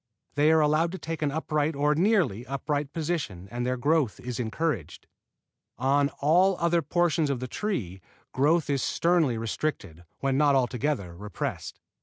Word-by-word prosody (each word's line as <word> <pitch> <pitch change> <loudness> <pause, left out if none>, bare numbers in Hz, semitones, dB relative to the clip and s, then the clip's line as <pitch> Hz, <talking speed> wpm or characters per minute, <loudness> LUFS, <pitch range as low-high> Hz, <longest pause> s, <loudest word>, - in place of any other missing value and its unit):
They 150 +2 +4
are 160 0 +5
allowed 155 +3 +2
to - - -4
take 160 -1 -5
an 150 - +1
upright 155 0 -1
or 145 +1 +2
nearly 165 - +2
upright 145 +1 -2
position 150 - -3
and 120 0 -3
their 130 0 0
growth 145 -3 +1
is 125 -1 -5
encouraged. 120 - -3 0.7
On 140 +3 +2
all 180 +6 +4
other 170 0 +2
portions 165 0 +1
of 135 -3 -1
the 130 - -4
tree 115 - -3 0.3
growth 155 +5 +2
is 140 -2 0
sternly 165 -8 +2
restricted, 110 - -4
when 135 0 0
not 145 -2 +4
altogether 125 - -1
repressed. 100 +1 -5
145 Hz, 155 wpm, -27 LUFS, 125-160 Hz, 0.7 s, are